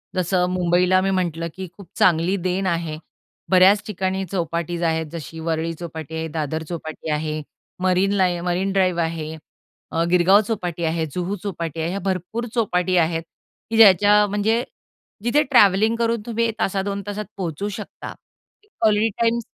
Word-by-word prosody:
जसं 180 0 +1
मुंबईला 180 +1 +3
मी 195 - 0
म्हटलं 170 -3 -1
की 190 0 -6
खूप 200 -3 -12
चांगली 175 +2 +3
देन 185 +2 -1
आहे. 165 -3 -2 0.5
बऱ्याच 190 +2 +6
ठिकाणी 190 -1 -2
चौपाटीज 170 -2 -2
आहेत 160 -1 +1
जशी 165 -1 -7
वरळी 165 0 -2
चौपाटी 160 -2 -7
आहे, 160 0 -3
दादर 155 0 -3
चौपाटी 160 -2 -6
आहे 155 0 -2 0.4
मरीन 185 +1 +2
लाईन 180 -3 +1
मरीन 180 +2 0
ड्राईव्ह 185 -3 +2
आहे, 160 -1 -3 0.6
अ, 165 - +1
गिरगाव 180 +3 +5
चौपाटी 175 -6 -3
आहे, 160 0 0
जुहू 180 +2 -2
चौपाटी 165 -5 -4
आहे, 160 - -1
ह्या 195 +3 -3
भरपूर 190 +5 -2
चौपाटी 185 -5 +1
आहेत 165 -1 +1 0.5
की 225 - -1
ज्याच्या 210 0 +7
म्हणजे 210 +4 +1 0.6
जिथे 280 +6 +3
ट्रॅव्हलिंगकरून 230 -1 +3
तुम्ही 230 0 0
1 225 -1 -2
तासात, 195 0 0
2 200 0 -3
तासात 205 +1 -4
पोहचू 185 +2 -3
शकता 210 +1 -8 0.7
क्वालिटी 215 0 +3
टाइम 230 0 +2
185 Hz, 155 wpm, -22 LUFS, 165-200 Hz, 0.7 s, ज्याच्या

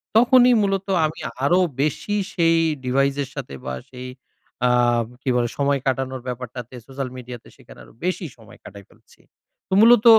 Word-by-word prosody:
তখনই 245 +1 +6
মূলত 195 -1 0 0.2
আমি 155 +1 -4 0.2
আরো 175 +6 +4 0.2
বেশি 180 +7 -1 0.2
সেই 165 -2 +3 0.3
ডিভাইসের 135 +1 +1
সাথে 135 - -6
বা 65 - -3 0.2
সেই 125 0 -8 0.6
আব 120 -1 +3 0.2
কী - - -2
বলে? 120 -1 +1
সময় 140 0 +1
কাটানোর 130 -1 -1
ব্যাপারটাতে, 125 0 -6
সোশ্যাল 135 -1 -5
মিডিয়াতে 125 -1 -9
সেখানে - - -16
আরো - - -18
বেশি 185 0 -1
সময় 110 -3 -16
কাটায় 100 0 -12
ফেলছি। - - -24 0.5
তো - - -4
মূলত 235 0 +6
135 Hz, 155 wpm, -22 LUFS, 125-175 Hz, 0.6 s, তখনই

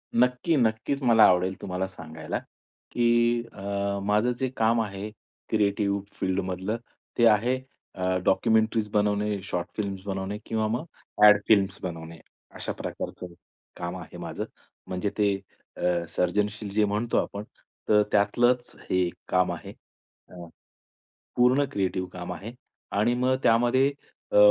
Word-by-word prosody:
नक्की, 125 +7 +3
नक्कीच 115 +4 0
मला 115 -3 +6
आवडेल 90 +1 +3
तुम्हाला 95 +1 -2
सांगायला, 80 -4 -6 0.5
की 120 0 +3
अ, 100 0 -2
माझं 105 +4 +2
जे 130 0 -1
काम 115 +1 +3
आहे, 100 -1 -5 0.4
क्रिएटिव्ह 100 -1 +1 0.2
फील्ड 95 0 0
मधलं, 95 +4 -3 0.4
ते 120 - +5
आहे 115 +4 +3 0.4
अ, 95 0 0
डॉक्युमेंटरीज 110 +1 +2
बनवणे, 105 -1 +1
शॉर्ट 90 -3 -3
फिल्म्स 100 -3 -3
बनवणे 95 +1 -3
किंवा 110 -1 0
मग 120 +8 -2 0.4
अ‍ॅड 105 -1 +9
फिल्म्स 100 -3 +3
बनवणे, 85 -2 -6 0.4
अशा - - -4
प्रकारचं 90 -1 -6 0.4
काम 85 +1 -4
आहे 90 - -10
माझं. - - -5 0.4
म्हणजे 95 +2 -2
ते 100 -2 +3 0.4
अ, 85 -1 0
सर्जनशील 105 +3 -1
जे 105 +2 +2
म्हणतो 105 +3 0
आपण, 100 +1 -1 0.5
तर 105 -1 +6
त्यातलंच 120 +4 +2 0.2
हे 90 -1 +2 0.2
काम 90 0 +2
आहे. - - -7 0.6
अ, 90 -1 -10 0.9
पूर्ण 125 +3 +4
क्रिएटिव 95 -2 -1
काम 90 0 -6
आहे. 100 +6 -7 0.4
आणि 110 +4 +2
मग 125 +1 +2
त्यामध्ये 120 +4 +4 0.4
अ, - - +2
105 Hz, 130 wpm, -27 LUFS, 95-115 Hz, 0.9 s, अ‍ॅड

